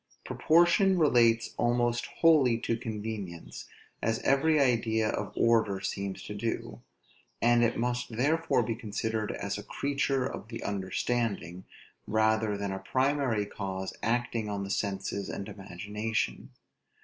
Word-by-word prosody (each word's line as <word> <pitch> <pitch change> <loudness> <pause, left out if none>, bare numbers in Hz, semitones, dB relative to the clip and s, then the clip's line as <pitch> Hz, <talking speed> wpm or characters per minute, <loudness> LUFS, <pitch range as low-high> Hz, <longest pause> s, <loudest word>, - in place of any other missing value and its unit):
Proportion 175 +4 +4
relates 120 -7 +3
almost 120 0 +1
wholly 145 -8 +4
to 115 - 0
convenience, 105 -6 -6 0.4
as 115 0 +1
every 150 +3 +3
idea 115 -4 +2
of - - -3
order 110 -4 +3
seems 100 0 -4
to - - -6
do; 115 +3 -4 0.6
and 120 0 +4
it 120 - +1
must 120 -1 -2
therefore 155 0 +2
be 115 - -1
considered 110 -1 -3
as 100 0 -4
a - - -8
creature 140 -2 -1
of 120 - -6
the 115 0 -7
understanding, 100 -1 -2 0.4
rather 110 -1 +2
than 100 -1 -3
a 95 - -3
primary 130 0 +1
cause 95 -2 -5
acting 115 -1 -1
on 100 -1 -3
the 95 - -5
senses 100 0 -2
and 100 - -5
imagination. 105 +2 -3
115 Hz, 130 wpm, -29 LUFS, 100-125 Hz, 0.6 s, Proportion